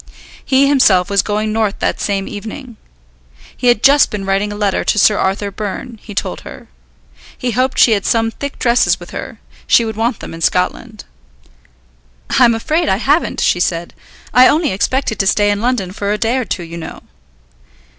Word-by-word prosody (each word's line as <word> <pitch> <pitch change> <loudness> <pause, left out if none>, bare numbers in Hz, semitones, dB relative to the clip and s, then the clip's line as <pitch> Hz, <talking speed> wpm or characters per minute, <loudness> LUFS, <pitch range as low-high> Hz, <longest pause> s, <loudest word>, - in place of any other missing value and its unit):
He 275 +1 +3
himself 205 -10 +3
was 200 -1 +3
going 215 +1 -2
North 215 -2 0
that - - -2
same 195 -1 -2
evening. 225 +4 -8 0.8
He 250 - -2
had 240 -2 +3
just 280 0 +5
been 200 -2 -5
writing 195 +2 0
a - - -6
letter 205 -2 0
to - - 0
Sir 210 +1 +4
Arthur 200 +1 -1
Byrne, 215 +3 -6
he 210 - -11
told 90 - -3
her. - - -12 0.7
He 250 - -2
hoped 255 +3 0
she 235 - +5
had 200 -3 +1
some 225 +1 +1
thick 280 +4 -7
dresses 240 0 +2
with - - -12
her; - - -7 0.3
she 235 - +4
would 220 -1 -4
want 225 +1 -1
them - - -8
in 165 - -9
Scotland. 185 +5 -1 1.3
"I 255 - +7
am 235 -1 +3
afraid 310 +8 -1
I 190 - +2
haven't," 285 +9 0
she 175 - +2
said. 170 -1 -2 0.4
"I 250 +3 +7
only 305 -1 +2
expected 225 +4 -1
to 195 - +1
stay 205 +1 +2
in 205 0 -2
London 235 -7 -1
for 200 +1 -3
a 210 - 0
day 230 +4 0
or 255 - -2
two, 180 - -4
you 170 0 -8
know." 160 -1 -8
215 Hz, 195 wpm, -16 LUFS, 200-250 Hz, 1.3 s, I